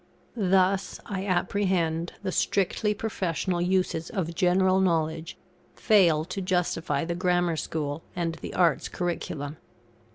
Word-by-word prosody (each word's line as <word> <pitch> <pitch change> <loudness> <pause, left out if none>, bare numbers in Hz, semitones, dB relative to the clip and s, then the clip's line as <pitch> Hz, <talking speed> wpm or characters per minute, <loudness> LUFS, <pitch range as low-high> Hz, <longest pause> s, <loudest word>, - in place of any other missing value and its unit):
Thus, 190 -2 +2
I 195 -2 -4
apprehend, 175 -3 0
the 190 - -1
strictly 205 +3 +1
professional 185 -4 -2
uses 180 -2 0
of 170 -4 -3
general 185 +2 +3
knowledge 165 -3 0 0.4
fail 170 -8 +4
to 185 +2 -4
justify 175 -5 0
the 170 - -2
Grammar 175 -1 +1
School 150 -1 -3
and 170 -2 -1
the - - -8
Arts' 170 -5 +2
curriculum. 155 -4 -4
180 Hz, 120 wpm, -27 LUFS, 165-190 Hz, 0.4 s, fail